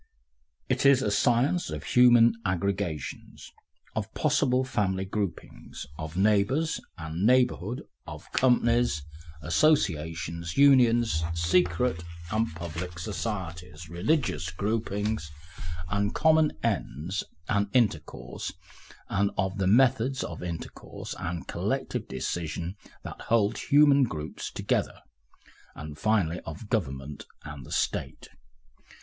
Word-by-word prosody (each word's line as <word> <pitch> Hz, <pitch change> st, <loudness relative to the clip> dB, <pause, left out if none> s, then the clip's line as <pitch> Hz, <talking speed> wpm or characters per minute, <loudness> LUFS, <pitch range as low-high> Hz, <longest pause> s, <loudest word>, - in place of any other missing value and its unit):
It 130 Hz, 0 st, 0 dB
is 140 Hz, -2 st, +6 dB
a 105 Hz, -, 0 dB
science 120 Hz, -, +2 dB
of -, -, -5 dB
human 120 Hz, -1 st, +6 dB
aggregations, 90 Hz, -5 st, -3 dB, 0.4 s
of 110 Hz, -2 st, -2 dB
all -, -, -38 dB
possible 135 Hz, -4 st, +2 dB
family 95 Hz, -7 st, -1 dB
groupings, 100 Hz, -6 st, -5 dB
of 80 Hz, +2 st, -6 dB
neighbours 110 Hz, +11 st, +2 dB, 0.2 s
and 80 Hz, +2 st, -4 dB
neighbourhood, 125 Hz, -2 st, +2 dB, 0.2 s
of -, -, -8 dB
companies, 120 Hz, -, +2 dB, 0.4 s
associations, 85 Hz, -, +1 dB
unions, 120 Hz, -, +5 dB
secret 85 Hz, +3 st, +1 dB, 0.3 s
and 110 Hz, +2 st, +1 dB
public 85 Hz, +1 st, -6 dB
societies, 90 Hz, -4 st, -5 dB
religious 90 Hz, -, 0 dB
groupings, 105 Hz, -1 st, -2 dB, 0.6 s
of 100 Hz, +3 st, -1 dB
common 160 Hz, -1 st, +4 dB
ends 85 Hz, +9 st, -2 dB, 0.2 s
and 100 Hz, -1 st, +1 dB
intercourse, 80 Hz, -, -1 dB, 0.6 s
and 100 Hz, +1 st, +1 dB
of 95 Hz, +1 st, -1 dB
the 95 Hz, -, +1 dB
methods 130 Hz, +4 st, +3 dB
of 80 Hz, -, -6 dB
intercourse 85 Hz, -2 st, -6 dB
and 85 Hz, 0 st, -4 dB
collective -, -, -2 dB
decision 85 Hz, +6 st, -3 dB, 0.3 s
that -, -, -8 dB
hold 110 Hz, -2 st, +2 dB
human 140 Hz, -1 st, +5 dB
groups 80 Hz, -8 st, -5 dB
together, -, -, -1 dB, 0.7 s
and 75 Hz, 0 st, -8 dB
finally 100 Hz, -6 st, +1 dB
of 85 Hz, +6 st, -9 dB
government 70 Hz, -, -3 dB, 0.2 s
and 70 Hz, -4 st, -9 dB
the -, -, -12 dB
State. -, -, -2 dB
100 Hz, 110 wpm, -28 LUFS, 85-120 Hz, 0.7 s, is